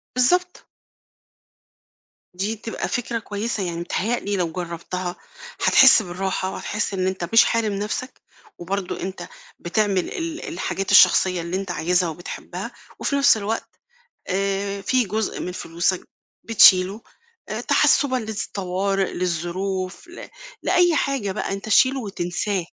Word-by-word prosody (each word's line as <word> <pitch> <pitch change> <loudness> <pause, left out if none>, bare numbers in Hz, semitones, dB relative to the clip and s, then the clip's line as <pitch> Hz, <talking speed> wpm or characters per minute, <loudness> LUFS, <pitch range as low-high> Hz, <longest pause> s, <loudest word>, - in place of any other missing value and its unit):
بالضبط. 360 +9 +1 1.7
دي 200 +5 -2
تبقى 225 +1 -5
فكرة 235 -1 -2
كويسة، 210 0 -3
يعني 170 -2 -3
متهيأ 200 +7 -1
لي 205 -1 -2
لو 170 -2 -1
جربتها 175 +1 -5 0.5
هتحس 265 -3 +7
بالراحة 190 0 -3
وهتحس 210 +1 -3
إن 185 -1 0
أنت 185 -2 -3
مش 225 - +7
حارم 225 -3 0
نفسك، 210 +6 -4 0.4
وبرضو 190 +1 -3
أنت 185 -2 -6 0.3
بتعمل 200 +2 0
ال 330 0 -5
الحاجات 195 - -3
الشخصية 185 -2 +6
اللي 170 +3 -3
أنت 195 -2 -4
عايزها 175 0 +1
وبتحبها، 175 +3 -7 0.3
وفي 280 - -1
نفس 280 -5 +5
الوقت، 215 +2 -3 0.6
آآ، 195 +1 -1
في 250 +5 +1
جزء 215 +1 -3
من 180 - -4
فلوسك 175 +1 -2 0.4
بتشيله، 195 -2 +6 0.5
آآ، - - -3
تحسبًا 270 -3 +3
للطوارئ، 195 -4 -2
للظروف، 185 - -3
ل 350 - -10 0.3
لأي 350 -3 +3
حاجة 265 -10 -1
بقى، - - -3
أنت 195 +2 -5
شيله 260 +5 +4
وتنساه. 190 -2 -2
195 Hz, 125 wpm, -22 LUFS, 180-225 Hz, 1.7 s, هتحس